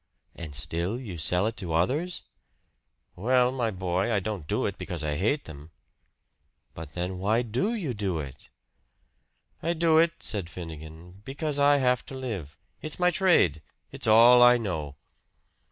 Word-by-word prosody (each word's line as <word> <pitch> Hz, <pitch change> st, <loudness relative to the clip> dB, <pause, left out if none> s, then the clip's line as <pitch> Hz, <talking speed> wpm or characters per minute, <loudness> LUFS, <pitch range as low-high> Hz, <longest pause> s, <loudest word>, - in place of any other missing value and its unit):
"And 80 Hz, -4 st, -8 dB
still 85 Hz, -, -2 dB
you 100 Hz, -10 st, -7 dB
sell 90 Hz, +5 st, +2 dB
it 115 Hz, +1 st, -2 dB
to 85 Hz, -5 st, -4 dB
others?" 145 Hz, -, 0 dB, 0.9 s
"Well, 125 Hz, +6 st, +2 dB
my 125 Hz, -3 st, -1 dB
boy, 95 Hz, +1 st, -1 dB
I 105 Hz, -, +2 dB
don't 95 Hz, -5 st, -5 dB
do -, -, 0 dB
it -, -, -4 dB
because 85 Hz, -3 st, -5 dB
I 75 Hz, -1 st, -1 dB
hate 110 Hz, -, 0 dB
them." 75 Hz, 0 st, -11 dB, 1.0 s
"But 80 Hz, -3 st, -9 dB
then, 90 Hz, +1 st, -4 dB
why 110 Hz, +5 st, +1 dB
DO 125 Hz, -, -1 dB
you 165 Hz, -, -3 dB
do 100 Hz, -5 st, -2 dB
it?" 70 Hz, -2 st, -9 dB, 1.1 s
"I 170 Hz, -, 0 dB
do 165 Hz, -1 st, +3 dB
it," 165 Hz, 0 st, +3 dB
said 100 Hz, -6 st, -4 dB
Finnegan, 85 Hz, +2 st, -10 dB
"because 145 Hz, +3 st, -4 dB
I 145 Hz, 0 st, +5 dB
have 125 Hz, -2 st, +1 dB
to 135 Hz, -, -8 dB
live. 100 Hz, -, -6 dB, 0.2 s
It's 155 Hz, -, -5 dB
my 180 Hz, 0 st, +3 dB
trade 160 Hz, -, +3 dB, 0.3 s
it's -, -, -5 dB
all 120 Hz, +3 st, +7 dB
I 120 Hz, 0 st, +7 dB
know." 80 Hz, -, -4 dB
105 Hz, 160 wpm, -27 LUFS, 85-130 Hz, 1.1 s, all